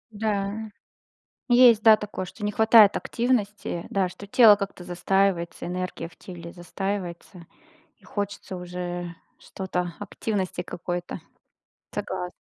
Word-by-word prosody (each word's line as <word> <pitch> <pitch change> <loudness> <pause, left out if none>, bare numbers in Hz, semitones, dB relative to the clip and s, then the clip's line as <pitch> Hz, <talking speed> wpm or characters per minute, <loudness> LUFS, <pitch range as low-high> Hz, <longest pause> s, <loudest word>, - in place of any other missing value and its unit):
Да, 205 -2 -1 1.0
есть, 240 -3 +7
да, 220 -1 +8
такое, 205 -3 -5
что 210 +4 -9
не 205 - -1
хватает 220 -1 +7
активности, 210 -7 -1
да 190 -2 0
что 190 +3 -11
тело 215 0 +7
как-то 195 -3 -6
застаивается, 180 0 0
энергия 180 -1 -4
в - - -21
теле 170 -2 -10
застаивается, 180 -1 -5 0.5
и - - -32
хочется 200 -2 -5
уже 175 -1 -5 0.2
что-то, 180 -2 -4
активности 195 -3 -3
какой-то. 175 0 -5 0.8
Согласна. 180 0 -4
195 Hz, 115 wpm, -25 LUFS, 175-205 Hz, 1.0 s, да